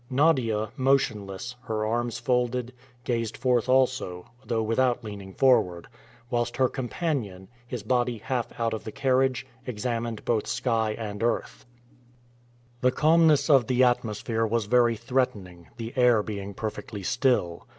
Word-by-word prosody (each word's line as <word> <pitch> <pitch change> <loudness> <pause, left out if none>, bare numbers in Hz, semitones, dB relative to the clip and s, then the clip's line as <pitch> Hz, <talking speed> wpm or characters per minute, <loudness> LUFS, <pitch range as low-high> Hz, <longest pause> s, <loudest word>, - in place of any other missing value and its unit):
Nadia, 125 -7 +2
motionless, 120 -4 0
her 110 -1 -1
arms 120 +1 -1
folded, 125 -1 0 0.3
gazed 115 -3 -2
forth 125 -1 +1
also, 130 -9 +1
though 115 -3 -1
without 120 +2 +1
leaning 100 -3 -8
forward, 110 -11 +3 0.4
whilst 120 0 -1
her 130 0 +4
companion, 125 - -3 0.2
his 120 -4 -5
body 120 +1 0
half 120 +2 -2
out 115 -1 0
of 110 - -4
the 110 - -6
carriage, 130 0 +1 0.2
examined 115 -1 -3
both 110 -3 0
sky 110 -3 0
and 105 -2 -5
earth. 120 +2 -2 1.1
The 125 - +4
calmness 155 +2 +4
of 135 -7 +5
the 130 0 +3
atmosphere 115 -2 0
was 115 -1 0
very 120 +1 +3
threatening, 105 - -2
the 115 0 -6
air 120 -4 +4
being 100 -2 -6
perfectly 105 -1 -5
still. 95 -7 0
120 Hz, 135 wpm, -26 LUFS, 110-130 Hz, 1.1 s, of